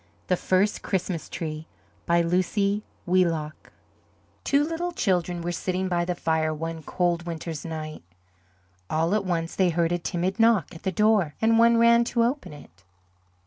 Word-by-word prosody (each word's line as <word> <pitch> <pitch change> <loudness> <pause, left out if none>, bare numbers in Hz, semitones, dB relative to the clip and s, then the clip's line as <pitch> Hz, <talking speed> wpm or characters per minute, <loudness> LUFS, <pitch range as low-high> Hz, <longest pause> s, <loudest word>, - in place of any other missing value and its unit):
THE 180 - +4
FIRST 190 +4 +1
CHRISTMAS 180 -4 -3
TREE 155 -1 -5 0.4
BY 170 0 +4
LUCY 200 +4 +1 0.2
WHEELOCK 165 -4 0 0.7
Two 280 +1 +3
little 330 +3 -2
children 180 - 0
were 175 - -2
sitting 185 +2 -2
by 175 -1 0
the 180 0 -2
fire 160 -2 0
one 165 +1 -5
cold 175 +1 -1
winter's 165 -2 -5
night. 155 -2 -6 0.9
All 165 +4 +1
at 210 -2 +1
once 165 -2 -2
they 185 -2 +3
heard 170 0 +1
a 175 - 0
timid 180 +4 -2
knock 225 -8 +3
at 165 - -11
the 190 - -1
door 205 -5 +2
and 225 0 +3
one 235 0 +5
ran 235 0 +5
to 235 0 +1
open 255 - -1
it. 95 - -15
175 Hz, 160 wpm, -25 LUFS, 165-205 Hz, 0.9 s, one